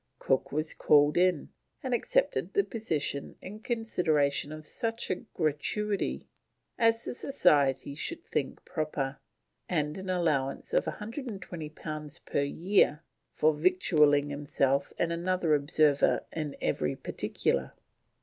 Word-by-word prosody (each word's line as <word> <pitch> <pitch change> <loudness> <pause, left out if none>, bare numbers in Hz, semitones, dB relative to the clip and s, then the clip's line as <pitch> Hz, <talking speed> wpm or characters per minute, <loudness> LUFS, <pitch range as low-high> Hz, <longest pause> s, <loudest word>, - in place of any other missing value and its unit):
Cook 135 - 0
was 155 +2 +1
called 145 0 +4
in, 180 -3 +2 0.3
and 260 -2 -1
accepted - - +1
the 400 - +4
position 160 - -3
in 210 +3 -9
consideration 160 - +1
of 155 0 -8
such 225 +6 -2
a 185 - 0 0.2
gratuity 190 +7 -1 0.5
as 230 0 +2
the - - -3
Society 145 - +2
should 335 - -3
think - - -3
proper, 150 -4 -3 0.5
and 150 -1 -1
an 190 0 -7
allowance 155 -7 0
of - - +2
120 210 - -6
pounds 155 0 -5
per - - -2
year 160 +1 +2 0.3
"for 155 +1 +3
victualling 150 -3 +3
himself 140 -1 0
and 170 - 0
another 175 -1 +1
observer 145 0 +3
in 155 -3 -4
every 75 -2 -1
particular." 65 -1 -1
155 Hz, 120 wpm, -29 LUFS, 145-190 Hz, 0.5 s, called